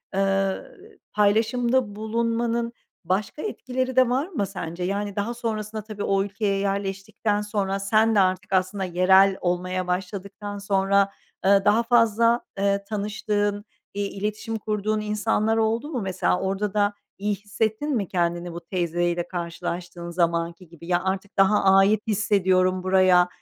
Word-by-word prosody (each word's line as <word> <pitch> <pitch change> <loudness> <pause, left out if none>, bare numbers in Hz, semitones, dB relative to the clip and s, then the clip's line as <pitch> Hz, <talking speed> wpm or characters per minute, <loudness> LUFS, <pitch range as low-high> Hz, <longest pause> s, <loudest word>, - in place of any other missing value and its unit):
eee, 195 0 +1 0.6
paylaşımda 225 +2 +2
bulunmanın 230 +2 -1 0.3
başka 195 - -1
etkileri 255 -9 -3
de 255 -2 +5
var 265 +6 0
mı 290 - -2
sence? 180 -2 -6
Yani, 200 +2 -2
daha 210 +3 -2
sonrasında 220 -2 -4
tabii 210 -1 -6
o 195 0 +2
ülkeye 200 0 -1
yerleştikten 195 +1 -1
sonra 200 -2 -2
sen 215 +3 +3
de - - +5
artık 185 +1 +1
aslında 190 +1 +1
yerel 190 +2 +4
olmaya 185 +1 -1
başladıktan 200 +2 -4
sonra, 200 0 +2 0.3
eee, 195 0 +5
daha 215 +3 +4
fazla, 230 0 +3 0.2
eee, 200 0 +1
tanıştığın, 205 -1 -1 0.3
eee, 205 - -2
iletişim 210 +3 -3
kurduğun 215 0 -1
insanlar 210 +1 0
oldu 225 +5 0
mu 260 -7 -3
mesela? 190 -2 0
Orada 195 +1 -1
da 205 -1 +2 0.2
iyi 205 +1 -1
hissettin 220 +7 -2
mi 205 -5 -1
kendini 175 -1 -1
bu 170 - -5
teyzeyle 175 -1 -1
karşılaştığın 170 0 -5
zamanki 170 0 -1
gibi? 170 +1 -13
"Ya, 175 0 +1
artık 190 +1 -3
daha 195 +2 +4
ait 195 +2 +5
hissediyorum 190 -3 +2
buraya, 185 -1 +5
200 Hz, 140 wpm, -24 LUFS, 185-215 Hz, 0.6 s, de